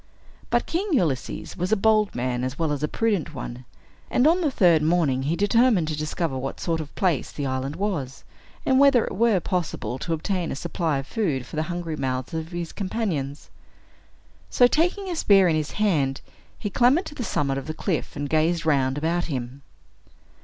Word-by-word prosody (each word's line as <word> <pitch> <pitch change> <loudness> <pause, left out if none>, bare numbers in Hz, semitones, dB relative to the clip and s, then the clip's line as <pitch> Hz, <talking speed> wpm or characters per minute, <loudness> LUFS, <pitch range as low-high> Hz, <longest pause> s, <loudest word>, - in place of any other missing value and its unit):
But - - +1
King 365 +5 -1
Ulysses 160 - -1
was 180 +3 -2
a - - +5
bold 215 0 +2
man 125 0 -1
as 130 +2 -3
well 160 -2 0
as 145 -1 -2
a 150 - +1
prudent 200 -6 -1
one; 125 0 -7 0.4
and 250 - +2
on 340 +4 +4
the 315 - +2
third 175 - +4
morning 155 -5 +2
he 150 +5 0
determined 205 -3 +3
to 155 - -2
discover 155 -2 -2
what 135 +1 -5
sort 165 -2 -1
of 150 - -7
a - - -26
place 175 -8 0
the 145 - -4
island 130 +2 -2
was, 165 -11 -3 0.4
and 260 0 +4
whether 275 -4 +5
it - - -5
were 215 -1 +3
possible 170 -7 -3
to 165 - -2
obtain 175 +2 -2
a - - -3
supply 155 +1 -1
of 135 - -4
food 150 - -1
for 120 - -10
the 155 - 0
hungry 175 -2 -3
mouths 130 -1 -3
of 160 0 -3
his 170 -1 -5
companions. 185 -9 -3 1.0
So, 245 - +5
taking 355 +9 +1
a 355 - -3
spear 195 - +5
in 165 - +2
his 155 -1 -2
hand, 150 -11 +1 0.4
he 205 - -4
clambered 255 - +3
to - - -8
the 260 - -5
summit 140 -9 -1
of 135 - -9
a - - -2
cliff, 170 -3 -2
and 145 0 -3
gazed 160 +3 +1
round 135 -3 +2
about 170 +3 0
him. 130 -2 -5
165 Hz, 200 wpm, -24 LUFS, 140-205 Hz, 1.0 s, a